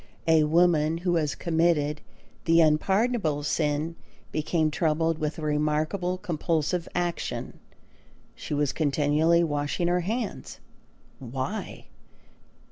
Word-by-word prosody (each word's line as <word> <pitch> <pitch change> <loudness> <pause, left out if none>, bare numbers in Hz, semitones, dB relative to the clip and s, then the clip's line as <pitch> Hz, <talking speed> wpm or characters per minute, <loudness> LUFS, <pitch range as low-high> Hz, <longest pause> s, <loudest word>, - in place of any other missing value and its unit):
A 160 -1 +5
woman 160 -1 +3
who 175 - +2
had 150 -3 -1
committed 160 -3 +1 0.4
the 165 0 +4
unpardonable 165 +1 +2
sin 150 +2 -1 0.4
became 155 0 0
troubled 160 0 0
with 150 0 -2
a 160 - -6
remarkable 155 +5 0
compulsive 165 -2 -1
action. 175 -1 -3 0.7
She 150 - -5
was 145 -1 0
continually 155 +3 +2
washing 145 +2 -1
her 175 +1 +2
hands. 220 +4 -4 0.6
Why? 130 - -5
160 Hz, 105 wpm, -26 LUFS, 150-175 Hz, 0.7 s, A